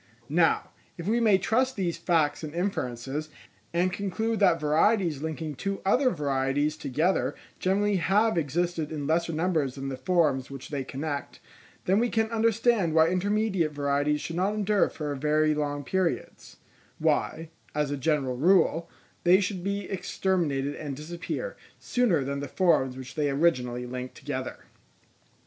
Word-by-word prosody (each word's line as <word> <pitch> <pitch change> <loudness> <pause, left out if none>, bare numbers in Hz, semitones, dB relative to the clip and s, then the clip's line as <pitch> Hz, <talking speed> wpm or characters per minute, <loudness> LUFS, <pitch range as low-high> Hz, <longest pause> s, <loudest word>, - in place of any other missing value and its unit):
Now, 165 +2 +2 0.3
if 170 +1 -6
we 230 +3 +2
may 215 -4 +5
trust 255 +7 +1
these 180 -4 -1
facts 160 -4 +1
and 155 +1 -6
inferences, 150 -5 -3 0.4
and 175 +2 +1
conclude 205 +4 -1
that 170 -5 +4
varieties 160 +1 +2
linking 160 -1 -4
two 195 +8 -3
other 255 +7 +4
varieties 145 - 0
together 155 +6 0 0.2
generally 200 +2 +2
have 205 +6 +2
existed 165 +1 -1
in 150 -2 -4
lesser 165 +3 +1
numbers 155 -5 0
than 135 0 -4
the 135 - -3
forms 135 -2 +1
which 135 -2 -8
they 140 -3 -2
connect, 140 +2 -5 0.5
then 190 +3 +3
we 240 +1 +2
can 220 0 0
understand 225 -5 +2
why 160 0 +6
intermediate 190 -3 0
varieties 145 +1 0
should 165 - -5
not 195 +4 +1
endure 210 -1 +2
for 150 -2 -4
very 155 +2 +2
long 145 -1 -2
periods: 185 +3 -2 0.4
why, 160 0 0 0.2
as 150 -1 0
a - - 0
general 135 -3 0
rule, 170 +1 +3 0.3
they 180 +2 +6
should 185 -2 -2
be 200 +1 -2
exterminated 170 -7 -1
and 145 -3 -5
disappear, 175 - -5 0.2
sooner 210 - +1
than 140 +1 -3
the 145 - -4
forms 135 -6 +2
which 130 -1 -8
they 150 -2 0
originally 125 -5 +1
linked 125 +1 -6
together. - - -5
165 Hz, 150 wpm, -27 LUFS, 145-190 Hz, 0.5 s, why